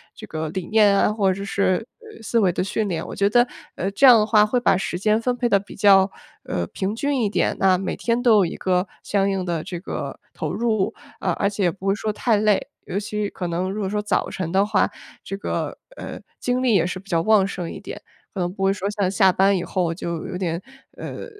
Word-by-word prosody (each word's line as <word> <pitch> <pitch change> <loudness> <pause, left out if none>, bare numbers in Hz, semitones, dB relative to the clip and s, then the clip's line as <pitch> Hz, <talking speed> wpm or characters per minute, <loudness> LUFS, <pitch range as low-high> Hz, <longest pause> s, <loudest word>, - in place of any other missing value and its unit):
这 - - -9
个 155 -1 -4
理 185 0 -4
念 210 -2 +4
啊 - - +2
或 200 -3 +2
者 195 +2 -4
是， 200 +2 0
呃， 440 - -14
思 230 - +1
维 190 -5 +3
的 180 - -1
训 205 +2 -1
练。 165 -2 -3
我 - - -7
觉 200 0 +2
得， 240 +3 +4 0.3
呃， 190 +3 -2
这 270 +7 +5
样 245 -3 +9
的 210 - +2
话 215 -1 +5
会 230 +4 +1
把 240 - +3
时 175 -1 -2
间 215 +4 +2
分 245 +1 -1
配 245 - +1
得 200 -4 +3
比 200 - -12
较， 195 -1 +5 0.4
呃， 90 -1 -2
平 195 - -3
均 280 +2 0
一 210 - +1
点。 - - 0
那 190 -1 +4
每 190 +1 -3
天 240 +1 -1
都 225 -3 +6
有 195 - +4
一 - - -6
个 185 0 0 0.2
相 200 -1 +1
应 190 -2 -1
的 170 -3 -2
这 175 -1 -6
个 185 - -6
投 - - -4
入。 220 -4 0 0.2
啊， 180 - 0
而 200 - +2
且 200 -1 -3
也 175 - +3
不 190 +2 -11
会 195 - +3
说 215 0 -2
太 220 0 +1
累， 215 +6 +2 0.2
尤 200 - -2
其 210 0 -3
可 180 - -5
能 175 +2 -2
如 205 - -4
果 190 - -1
说 210 +1 -1
早 210 -2 0
晨 170 -3 -4
的 190 +2 +3
话， 210 -1 +2 0.3
这 195 - -5
个， - - -3 0.2
呃， - - -7 0.2
精 250 +1 0
力 245 -4 +3
也 170 -4 +3
是 185 +1 -4
比 195 - -18
较 165 -2 +2
旺 210 +1 +4
盛 180 -4 -5
一 - - -8
点， - - -8 0.3
可 195 - -5
能 175 -1 -1
不 195 - -4
会 195 - +4
说 200 0 -3
像 205 -3 0
下 190 -1 +4
班 195 +2 +3
以 175 - -3
后 180 -2 -1
就 170 -1 -5
有 180 - -5
点， 170 -1 -2 0.4
呃， - - -6
195 Hz, 270 characters per minute, -22 LUFS, 185-215 Hz, 0.4 s, 样